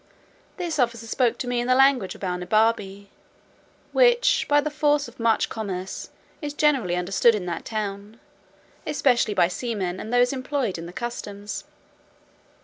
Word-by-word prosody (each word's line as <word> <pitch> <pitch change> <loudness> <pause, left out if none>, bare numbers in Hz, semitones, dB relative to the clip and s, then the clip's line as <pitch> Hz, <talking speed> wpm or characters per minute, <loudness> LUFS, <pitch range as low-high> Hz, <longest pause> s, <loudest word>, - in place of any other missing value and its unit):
This 345 -5 -3
officer 235 -2 0
spoke 235 +1 +1
to 250 - -4
me 245 0 0
in 240 - -2
the 255 - +4
language 265 -7 +3
of - - -15
Balnibarbi, 200 +2 0 0.8
which, - - +4
by 290 0 +5
the 300 +1 -2
force 295 -1 +1
of 240 +1 -15
much 230 -1 +2
commerce, 190 -4 -5 0.3
is 295 -1 -5
generally 270 -14 +2
understood 195 +6 +3
in 195 -4 -4
that 170 -2 -4
town, 210 0 -5 0.7
especially 255 -8 +2
by 170 - +4
seamen 185 -2 -3
and 220 - -6
those 245 +1 +3
employed 255 - -2
in 165 - -7
the - - -9
customs. 205 -2 -6
230 Hz, 150 wpm, -24 LUFS, 200-275 Hz, 0.8 s, by